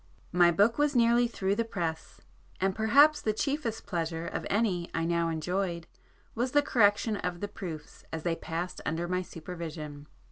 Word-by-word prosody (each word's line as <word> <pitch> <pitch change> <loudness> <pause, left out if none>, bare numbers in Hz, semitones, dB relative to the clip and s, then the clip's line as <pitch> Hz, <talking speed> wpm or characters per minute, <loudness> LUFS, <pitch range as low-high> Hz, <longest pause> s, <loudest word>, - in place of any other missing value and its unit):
My 175 -1 +5
book 205 - +3
was 295 -1 +2
nearly 240 0 +4
through 195 -4 -1
the 230 +3 +1
press,—and 180 0 -4
perhaps 285 +8 +5
the 215 - 0
chiefest 270 -2 -2
pleasure 170 -4 -2
of - - -4
any 195 -5 0
I 165 0 0
now 170 0 +1
enjoyed 170 +1 -2 0.5
was 245 +2 -1
the 290 0 +5
correction 210 -4 +3
of 180 -2 -3
the 205 - -3
proofs 165 -7 -8
as 160 -1 -4
they 170 -1 0
passed 170 +2 -4
under 165 +3 -2
my 180 +1 0
supervision. 155 -4 -7
180 Hz, 165 wpm, -29 LUFS, 165-225 Hz, 0.5 s, My